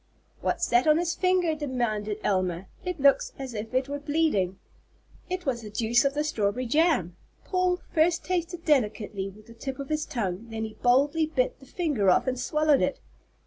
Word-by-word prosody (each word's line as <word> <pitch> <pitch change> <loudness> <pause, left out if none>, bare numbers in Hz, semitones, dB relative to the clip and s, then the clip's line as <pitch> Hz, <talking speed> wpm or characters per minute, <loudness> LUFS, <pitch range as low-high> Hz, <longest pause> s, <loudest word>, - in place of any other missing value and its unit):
_" - - -29
"What's - - 0
that 245 +4 +3
on 305 0 +6
his 340 0 0
finger?" 365 -3 +2
demanded 240 -8 -2
Elma. 185 -2 0 0.2
"It 360 -3 -4
looks 390 - +4
as 265 -3 -6
if 220 0 -5
it 260 +1 +1
were 285 +1 -4
bleeding." 285 - 0 0.7
It 365 -1 -3
was 250 -4 -1
the 215 - -8
juice 225 +3 +2
of 275 0 +1
the 300 - +1
strawberry 240 -4 -1
jam! 250 - +2 0.3
Paul 365 -1 +1
first 335 +1 +2
tasted 350 -1 -2
delicately 210 -8 0
with 210 +2 -16
the 230 - -13
tip 265 +3 -6
of 275 -1 -6
his 305 0 -1
tongue, 205 -2 -3
then 225 0 -4
he 220 - -7
boldly 285 +7 +2
bit - - -1
the - - -16
finger 290 - +1
off 180 - +4
and 255 -1 -1
swallowed 300 +2 +2
it. 280 - 0
270 Hz, 190 wpm, -27 LUFS, 220-320 Hz, 0.7 s, on